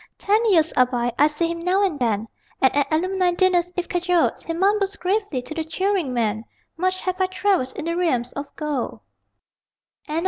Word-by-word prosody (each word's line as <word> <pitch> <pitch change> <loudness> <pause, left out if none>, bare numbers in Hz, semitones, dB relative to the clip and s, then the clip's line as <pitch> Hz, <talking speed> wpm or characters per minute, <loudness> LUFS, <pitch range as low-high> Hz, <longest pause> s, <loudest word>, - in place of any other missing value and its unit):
Ten 425 +3 +2
years 330 -7 +3
are 255 -1 +4
by: 245 -1 -1
I 295 - +7
see 330 +3 -1
him 335 - -4
now 365 +4 +1
and 345 -7 0
then, 225 -3 0 0.3
And 265 - +3
at 285 0 +1
alumni 365 +2 +1
dinners, 355 -1 +2
if 360 - -1
cajoled, 355 -1 +2
He - - -4
mumbles 395 +3 +1
gravely, 375 - -1
to 310 - -7
the 320 0 -2
cheering 370 -2 -1
men: 220 -3 -1 0.3
_Much 370 +2 -1
have 370 0 -2
I 375 - +3
travelled 375 -8 0
in 320 - -4
the 335 0 -1
realms 255 -9 0
of 285 0 -5
gold. 300 -5 -3
335 Hz, 185 wpm, -22 LUFS, 280-370 Hz, 0.3 s, I